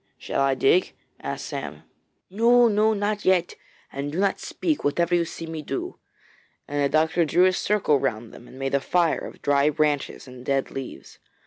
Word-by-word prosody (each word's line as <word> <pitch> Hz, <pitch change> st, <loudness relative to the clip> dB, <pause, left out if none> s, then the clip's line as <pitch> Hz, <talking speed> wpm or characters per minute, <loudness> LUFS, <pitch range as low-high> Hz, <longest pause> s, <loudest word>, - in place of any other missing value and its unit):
'Shall -, -, -2 dB
I 135 Hz, -1 st, +2 dB
dig?' 155 Hz, +7 st, +2 dB, 0.3 s
asked -, -, -5 dB
Sam. -, -, -6 dB, 0.5 s
'No! 235 Hz, +4 st, +5 dB
no! 215 Hz, 0 st, +2 dB
not 205 Hz, +1 st, -2 dB
yet. 185 Hz, -2 st, +2 dB, 0.4 s
And 140 Hz, +1 st, -4 dB
do 160 Hz, -, -5 dB
not 195 Hz, -1 st, +1 dB
speak, 315 Hz, -3 st, -2 dB
whatever 170 Hz, +4 st, +1 dB
you 170 Hz, -1 st, +3 dB
see 165 Hz, -, -7 dB
me 160 Hz, -1 st, -6 dB
do,' 135 Hz, -2 st, -5 dB, 0.7 s
and 145 Hz, 0 st, -1 dB
the 140 Hz, -, +2 dB
doctor 160 Hz, +3 st, +2 dB
drew 170 Hz, +4 st, +3 dB
a 185 Hz, -, +3 dB
circle 185 Hz, -7 st, +1 dB
round 120 Hz, -4 st, -3 dB
them 120 Hz, -, -13 dB
and 130 Hz, -, -14 dB
made 135 Hz, 0 st, -3 dB
a 140 Hz, -, +3 dB
fire 170 Hz, +4 st, +1 dB
of -, -, -10 dB
dry 145 Hz, +1 st, +3 dB
branches 150 Hz, -2 st, -1 dB
and 125 Hz, -1 st, -11 dB
dead 135 Hz, 0 st, -1 dB
leaves. 135 Hz, -2 st, -8 dB
155 Hz, 190 wpm, -24 LUFS, 140-185 Hz, 0.7 s, No